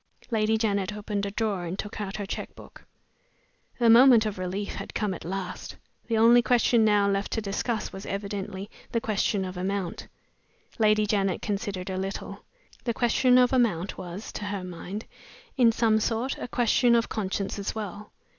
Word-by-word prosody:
Lady 220 Hz, 0 st, +2 dB
Janet 205 Hz, -2 st, 0 dB
opened 205 Hz, -1 st, -3 dB
a -, -, -2 dB
drawer, 200 Hz, -3 st, -2 dB
and 175 Hz, +3 st, -4 dB
took 210 Hz, +1 st, -5 dB
out 195 Hz, -1 st, -4 dB
her 205 Hz, -, -4 dB
check -, -, -6 dB
book. -, -, -14 dB, 0.9 s
The 235 Hz, -, +3 dB
moment 235 Hz, 0 st, +7 dB
of 205 Hz, -3 st, -3 dB
relief 190 Hz, +3 st, -3 dB
had -, -, -7 dB
come 210 Hz, -3 st, 0 dB
at -, -, -8 dB
last! 185 Hz, +1 st, -5 dB, 0.3 s
The 230 Hz, -, +1 dB
only 235 Hz, +2 st, +7 dB
question 235 Hz, 0 st, +3 dB
now 205 Hz, -2 st, +4 dB
left 200 Hz, 0 st, -1 dB
to -, -, 0 dB
discuss 210 Hz, +2 st, -2 dB
was 195 Hz, -, -8 dB
evidently 200 Hz, -1 st, -4 dB, 0.2 s
the 230 Hz, -, +1 dB
question 205 Hz, -3 st, 0 dB
of 185 Hz, 0 st, -6 dB
amount. 190 Hz, -1 st, -3 dB, 0.7 s
Lady 215 Hz, -1 st, +4 dB
Janet 195 Hz, -3 st, 0 dB
considered 195 Hz, -3 st, -3 dB
a 185 Hz, -, -3 dB
little. 195 Hz, +1 st, -5 dB, 0.4 s
The 235 Hz, -2 st, -1 dB
question 250 Hz, +1 st, +4 dB
of 250 Hz, +1 st, +4 dB
amount 205 Hz, -8 st, +1 dB
was 185 Hz, +3 st, -7 dB
(to 210 Hz, -, -5 dB
her 200 Hz, -2 st, -3 dB
mind) 185 Hz, +4 st, -6 dB, 0.5 s
in 240 Hz, -3 st, +5 dB
some 225 Hz, -1 st, +2 dB
sort 230 Hz, +4 st, -1 dB
a -, -, -4 dB
question 240 Hz, 0 st, +3 dB
of 230 Hz, 0 st, +2 dB
conscience 195 Hz, -1 st, -3 dB
as 200 Hz, -, -3 dB
well. 210 Hz, -1 st, -6 dB
210 Hz, 175 wpm, -27 LUFS, 195-225 Hz, 0.9 s, moment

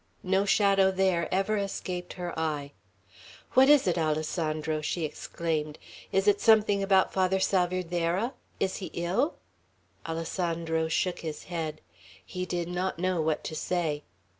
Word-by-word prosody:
No 190 Hz, +2 st, +2 dB
shadow 195 Hz, -1 st, +4 dB
there 185 Hz, -3 st, +1 dB
ever 195 Hz, +3 st, +1 dB
escaped 185 Hz, -3 st, -4 dB
her 175 Hz, -1 st, -5 dB
eye. 150 Hz, -3 st, -2 dB, 0.8 s
"What 265 Hz, +1 st, +6 dB
is 295 Hz, -2 st, +6 dB
it, 175 Hz, -2 st, +1 dB
Alessandro?" 155 Hz, 0 st, -1 dB
she 160 Hz, +2 st, -1 dB
exclaimed. 155 Hz, -1 st, -3 dB, 0.3 s
"Is 195 Hz, +1 st, +1 dB
it 200 Hz, -1 st, +4 dB
something 215 Hz, -3 st, +5 dB
about 195 Hz, -1 st, +3 dB
Father 190 Hz, 0 st, +2 dB
Salvierderra? 180 Hz, +3 st, 0 dB, 0.3 s
Is 190 Hz, -1 st, 0 dB
he 190 Hz, -, -5 dB
ill?" 190 Hz, -, 0 dB, 0.7 s
Alessandro 165 Hz, 0 st, -1 dB
shook 180 Hz, +2 st, 0 dB
his 155 Hz, -2 st, -6 dB
head. 160 Hz, -3 st, -4 dB, 0.4 s
He 185 Hz, 0 st, -5 dB
did 175 Hz, -2 st, -2 dB
not 180 Hz, +1 st, -2 dB
know 185 Hz, -1 st, 0 dB
what 155 Hz, -1 st, 0 dB
to 160 Hz, -, -5 dB
say. 155 Hz, -2 st, -1 dB
180 Hz, 140 wpm, -28 LUFS, 160-190 Hz, 0.8 s, What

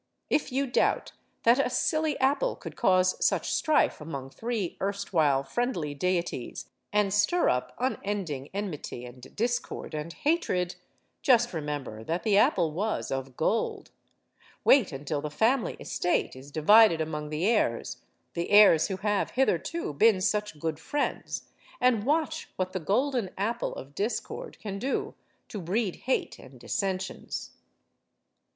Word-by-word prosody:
If 295 Hz, -, +1 dB
you 275 Hz, +2 st, +1 dB
doubt 245 Hz, -, +1 dB, 0.3 s
that 235 Hz, +3 st, +5 dB
a -, -, -1 dB
silly 310 Hz, +4 st, 0 dB
apple 285 Hz, -, +2 dB
could -, -, -9 dB
cause 185 Hz, -4 st, +3 dB
such -, -, +1 dB
strife 310 Hz, -, +2 dB
among 140 Hz, -4 st, -6 dB
three 225 Hz, -, -3 dB
erstwhile 170 Hz, -9 st, +1 dB
friendly 170 Hz, -, -2 dB
deities 170 Hz, -4 st, -2 dB, 0.2 s
and 205 Hz, -2 st, +2 dB
stir 210 Hz, +13 st, +3 dB
up 125 Hz, -, -1 dB
unending 195 Hz, -, -2 dB
enmity 180 Hz, -11 st, -5 dB
and 125 Hz, +1 st, -12 dB
discord 240 Hz, -6 st, -2 dB
and 155 Hz, +2 st, -4 dB
hatred, 235 Hz, -, 0 dB, 0.5 s
just 240 Hz, -4 st, +4 dB
remember 145 Hz, -8 st, -4 dB
that 165 Hz, +8 st, -2 dB
the 215 Hz, -3 st, +3 dB
apple 175 Hz, -5 st, +4 dB
was 205 Hz, +7 st, -2 dB
of 135 Hz, -1 st, -4 dB
gold. 220 Hz, +8 st, -1 dB, 0.7 s
Wait 265 Hz, -10 st, +5 dB
until 145 Hz, +1 st, -3 dB
the 150 Hz, -, -4 dB
family 225 Hz, -, +1 dB
estate 175 Hz, -, -1 dB
is 130 Hz, +2 st, -11 dB
divided 170 Hz, +5 st, +6 dB
among 150 Hz, -1 st, -3 dB
the 155 Hz, +4 st, -1 dB
heirs 210 Hz, -, +1 dB, 0.4 s
the 170 Hz, -, -3 dB
heirs 205 Hz, -6 st, +7 dB
who 190 Hz, -3 st, -3 dB
have 205 Hz, +1 st, 0 dB
hitherto 270 Hz, -, 0 dB
been 205 Hz, +6 st, +4 dB
such 210 Hz, -4 st, -1 dB
good 160 Hz, 0 st, -2 dB
friends 290 Hz, -, -2 dB, 0.4 s
and 245 Hz, -4 st, +3 dB
watch 315 Hz, +1 st, 0 dB
what 185 Hz, 0 st, -2 dB
the 185 Hz, -, -1 dB
Golden 240 Hz, -, 0 dB
Apple 230 Hz, +5 st, -2 dB
of 135 Hz, +2 st, -9 dB
Discord 240 Hz, -, -3 dB
can 200 Hz, -2 st, -6 dB
do 265 Hz, +6 st, -2 dB, 0.4 s
to 210 Hz, -, -5 dB
breed 190 Hz, +3 st, -1 dB
hate 260 Hz, -, -2 dB
and 130 Hz, -1 st, -14 dB
dissensions. 190 Hz, -, -3 dB
195 Hz, 140 wpm, -28 LUFS, 155-240 Hz, 0.7 s, heirs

